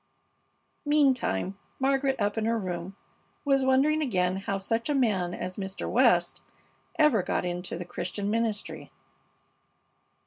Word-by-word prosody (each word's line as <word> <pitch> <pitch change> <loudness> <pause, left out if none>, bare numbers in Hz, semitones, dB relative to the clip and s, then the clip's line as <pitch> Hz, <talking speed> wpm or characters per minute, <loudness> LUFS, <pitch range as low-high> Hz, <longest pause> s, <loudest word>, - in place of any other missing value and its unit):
Meantime 260 - +1 0.2
Margaret, 270 0 +1
up 205 0 0
in 220 -1 -1
her 230 +1 +1
room, 185 -1 -5 0.5
was 275 -1 +3
wondering 275 +4 +3
again 185 -9 +1
how 195 0 -2
such 225 +6 -2
a 295 - +2
man 205 -9 +1
as 185 0 -5
Mr. 190 -1 -4
West - - +3 0.6
ever 300 -10 +4
got 180 - -1
into 175 0 -3
the 175 - -6
Christian 205 +3 -3
ministry. 225 -2 -2
215 Hz, 130 wpm, -28 LUFS, 185-270 Hz, 0.6 s, ever